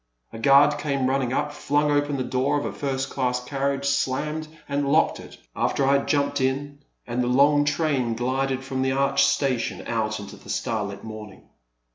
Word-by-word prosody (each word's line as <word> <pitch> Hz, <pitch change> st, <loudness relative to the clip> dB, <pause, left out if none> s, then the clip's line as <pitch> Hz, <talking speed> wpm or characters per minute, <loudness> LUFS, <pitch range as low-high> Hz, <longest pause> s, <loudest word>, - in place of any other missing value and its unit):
A -, -, -7 dB
guard 140 Hz, +4 st, +5 dB
came 140 Hz, -3 st, -1 dB
running 130 Hz, -2 st, 0 dB
up, 145 Hz, +2 st, -1 dB
flung 145 Hz, +1 st, +1 dB
open 145 Hz, -1 st, +1 dB
the 130 Hz, -, -1 dB
door 130 Hz, +4 st, 0 dB
of 145 Hz, -, -3 dB
a -, -, -3 dB
first 135 Hz, -1 st, -3 dB
class 125 Hz, -2 st, 0 dB
carriage, 140 Hz, +1 st, -2 dB
slammed 150 Hz, +3 st, -1 dB, 0.2 s
and 140 Hz, -1 st, -1 dB
locked 160 Hz, +2 st, +3 dB
it, -, -, -12 dB, 0.2 s
after 135 Hz, -, 0 dB
I 135 Hz, -, +4 dB
had -, -, -7 dB
jumped 140 Hz, -1 st, +1 dB
in, 140 Hz, +2 st, -1 dB, 0.3 s
and 120 Hz, +1 st, -2 dB
the 120 Hz, -, 0 dB
long 145 Hz, +3 st, +4 dB
train 145 Hz, -6 st, 0 dB
glided 130 Hz, +2 st, -1 dB
from 130 Hz, -1 st, -3 dB
the 130 Hz, 0 st, +1 dB
arched 140 Hz, 0 st, +3 dB
station 135 Hz, -4 st, -1 dB
out 110 Hz, -2 st, -1 dB
into 100 Hz, -1 st, -9 dB
the -, -, -15 dB
starlit 105 Hz, -5 st, -3 dB
morning. 110 Hz, -2 st, -9 dB
135 Hz, 185 wpm, -24 LUFS, 125-145 Hz, 0.3 s, guard